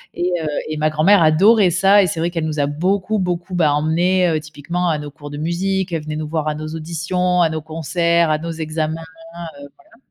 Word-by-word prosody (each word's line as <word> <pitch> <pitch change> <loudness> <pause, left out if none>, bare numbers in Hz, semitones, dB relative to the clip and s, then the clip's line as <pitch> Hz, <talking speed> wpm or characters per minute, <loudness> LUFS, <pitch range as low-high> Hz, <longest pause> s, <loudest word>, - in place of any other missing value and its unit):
et 180 +1 -1
heu 155 - -3 0.2
et 155 - -3
ma 155 +1 +1
grand-mère 170 +6 +4
adorait 190 +5 +5
ça 195 +3 +5
et - - +1
c'est 165 -1 -3
vrai 170 +1 0
qu'elle 165 -2 -2
nous 155 -1 -3
a 145 - +2
beaucoup, 190 +8 -1
beaucoup, 180 0 -3
bah, 155 -4 +3
emmenés, 175 +5 +2
heu, 160 -1 0
typiquement 155 +4 -3
à 155 - +1
nos 145 -1 -7
cours 145 -1 -11
de 145 - -6
musique. 185 +4 -1
Elle 160 - -2
venait 155 0 -5
nous 155 0 -4
voir 155 0 -2
à 150 - -1
nos 155 0 -6
auditions, 170 +3 -1
à 165 - +2
nos 155 -1 -4
concerts, 170 +2 0
à 155 - +2
nos 165 +1 -5
examens, 160 -1 -3
heu, 165 0 -15 0.5
voilà. 225 - -24
165 Hz, 230 wpm, -19 LUFS, 155-180 Hz, 0.5 s, adorait